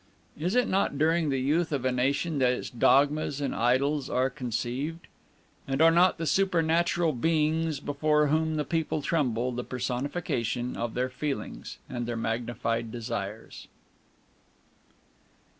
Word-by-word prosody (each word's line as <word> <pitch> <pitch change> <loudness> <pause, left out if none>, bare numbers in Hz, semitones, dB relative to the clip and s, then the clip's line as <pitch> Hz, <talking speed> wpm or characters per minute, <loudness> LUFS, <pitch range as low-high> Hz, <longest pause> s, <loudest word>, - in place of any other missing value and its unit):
Is 175 +7 -2
it 250 -1 +3
not 190 -6 0
during 160 +1 +2
the 135 - 0
youth 155 +6 +1
of 140 -3 -1
a 130 - +2
nation 140 +5 0
that 125 -1 +3
its - - -5
dogmas 145 +4 +3
and 140 - -2
idols 135 +4 +1
are 130 +1 +1
conceived? 130 +5 -4 0.6
And 135 0 -1
are 165 +1 +7
not 175 +2 +4
the 165 - -3
supernatural 170 -2 +2
beings 155 +2 +1
before 150 +1 +1
whom 160 +2 +1
the 150 -1 -1
people 155 -1 -1
tremble 125 -7 0
the 125 0 -4
personification 125 -1 -2
of 115 -1 -3
their 125 +1 -1
feelings 140 +2 -5
and 120 -2 -4
their 120 -1 -3
magnified 115 0 -2
desires? 110 -3 -6
140 Hz, 140 wpm, -28 LUFS, 125-160 Hz, 0.6 s, are